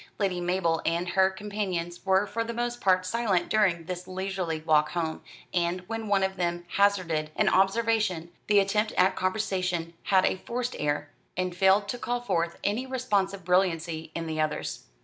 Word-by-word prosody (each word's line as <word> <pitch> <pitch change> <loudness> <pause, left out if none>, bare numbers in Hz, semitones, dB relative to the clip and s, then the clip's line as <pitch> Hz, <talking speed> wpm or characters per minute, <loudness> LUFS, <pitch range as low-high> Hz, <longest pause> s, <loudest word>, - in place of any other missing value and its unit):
Lady 185 -3 0
Mabel 175 -2 +1
and 170 +2 0
her 190 +2 +4
companions 190 -4 -4
were 190 +1 +4
for 230 +2 -2
the 230 0 -5
most 240 0 -2
part 185 -1 +3
silent 200 -2 0
during 190 -6 +2
this 180 +1 -6
leisurely 185 -3 -3
walk 155 -1 +3
home, 165 -2 -2 0.3
and, 175 0 0
when 225 +4 -5
one 200 -1 +3
of 190 0 -1
them 175 -1 -1
hazarded 185 -7 +2
an - - +2
observation, 195 -3 +2 0.2
the 210 - +4
attempt 210 +2 +2
at 185 +1 +3
conversation 185 -4 -1
had 190 -1 +4
a - - +1
forced 245 +5 -3
air, 145 0 -1 0.3
and 185 -1 -1
failed 195 +2 +4
to 245 - -4
call 245 +1 -1
forth 170 -8 -1
any 230 +6 0
responsive 200 -7 -1
brilliancy 165 -3 +1
in 165 - -3
the 160 -1 -2
others. 155 -1 -3
185 Hz, 170 wpm, -27 LUFS, 170-205 Hz, 0.3 s, her